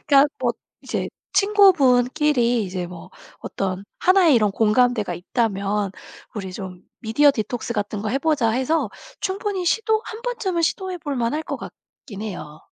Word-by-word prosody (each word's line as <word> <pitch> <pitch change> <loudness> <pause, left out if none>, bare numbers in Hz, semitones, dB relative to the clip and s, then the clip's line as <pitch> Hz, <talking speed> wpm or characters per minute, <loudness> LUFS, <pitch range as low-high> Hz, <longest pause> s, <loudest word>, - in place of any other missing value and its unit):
그니까 280 -1 +5
뭐 - - +1 0.3
이제 - - -3 0.2
친구분끼리 285 - +4
이제 180 -2 -4
뭐 180 +1 -11 0.3
어떤 190 0 -4 0.2
하나의 365 -5 +5
이런 215 -4 +3
공감대가 215 -1 +2
있다면, 200 +1 -1 0.4
"우리 190 -4 -5
좀 185 -2 -8 0.2
미디어 265 +6 +4
디톡스 235 0 -3
같은 205 -1 -3
거 215 - -2
해 260 +6 0
보자." 285 -7 +2
해서 260 +1 0 0.3
충분히 390 -1 -2
시도 440 +4 +1
한 445 +1 -8
번쯤은 460 -9 -1
시도해 370 +2 -1
볼 290 -3 -4
만할 245 +7 -1
것 - - -4
같긴 205 -5 -11
해요. 155 -8 -7
245 Hz, 305 characters per minute, -22 LUFS, 205-325 Hz, 0.4 s, 그니까